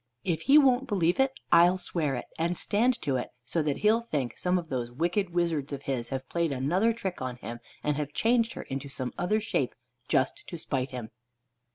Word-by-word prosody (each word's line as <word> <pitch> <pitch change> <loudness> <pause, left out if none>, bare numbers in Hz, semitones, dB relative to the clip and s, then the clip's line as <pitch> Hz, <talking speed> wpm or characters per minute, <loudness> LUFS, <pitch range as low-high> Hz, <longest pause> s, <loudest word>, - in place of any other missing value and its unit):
If 165 -4 -1
he 285 - +9
won't 265 -3 +5
believe, 185 -1 +2 0.3
I'll 175 +2 +6
swear 155 -6 -1
it, 125 - -4
and 170 +2 0
stand 240 +4 +2
to 135 -3 +1
it, 125 - -4 0.2
so 160 +7 0
that 150 -2 0
he'll 220 +2 +5
think 145 - -2
some 180 0 +1
of 170 -2 -4
those 125 -3 -2
wicked 175 - 0
wizards 170 -5 0
of 140 0 -5
his 120 -4 -2
have 135 -1 -4
played 170 0 0
another 170 - +2
trick 195 -8 -4
on 130 -1 -3
him, 120 -1 -7 0.2
and 150 -1 0
have 145 -1 -3
changed 230 +5 +2
her - - -6
into 135 +1 -5
some 130 -2 -3
other 180 +5 +2
shape 205 - -1 0.3
just 130 - +1
to 170 - -6
spite 135 -4 -2
him." 120 -4 -6
165 Hz, 205 wpm, -28 LUFS, 135-190 Hz, 0.3 s, he